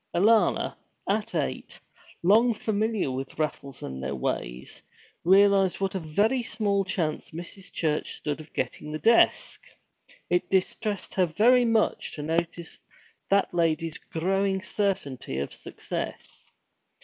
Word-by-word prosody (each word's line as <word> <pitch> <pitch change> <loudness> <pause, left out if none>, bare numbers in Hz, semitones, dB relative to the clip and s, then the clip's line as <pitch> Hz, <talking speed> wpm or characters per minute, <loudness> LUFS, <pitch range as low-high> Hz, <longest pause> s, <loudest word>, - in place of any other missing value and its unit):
Alanna, 215 +5 +3 0.3
at - - -1
eight, - - -3 0.4
long 225 +6 +5
familiar 215 -6 0
with 135 +1 -5
raffles 140 -3 -3
and 65 0 -6
their 65 +1 -3
ways, 60 0 -4 0.4
realized 195 +1 +5
what 195 -1 -1
a 190 - -1
very 205 +11 +1
small 210 -4 0
chance 170 -5 -2
Mrs. 175 +4 -9
Church 155 -2 -1
stood 150 0 -4
of 155 - -15
getting 150 - -4
the 155 - -2
desk. 230 +8 +3 0.7
It 180 0 0
distressed 195 +1 -1
her 185 -2 +2
very 240 +9 +4
much 225 -2 +1
to 150 - -5
notice 170 +2 -2 0.5
that 200 -2 +2
lady's 165 -2 0
growing 190 +3 -1
certainty 145 - -2
of 70 - -3
success. - - -7
185 Hz, 125 wpm, -27 LUFS, 155-205 Hz, 0.7 s, long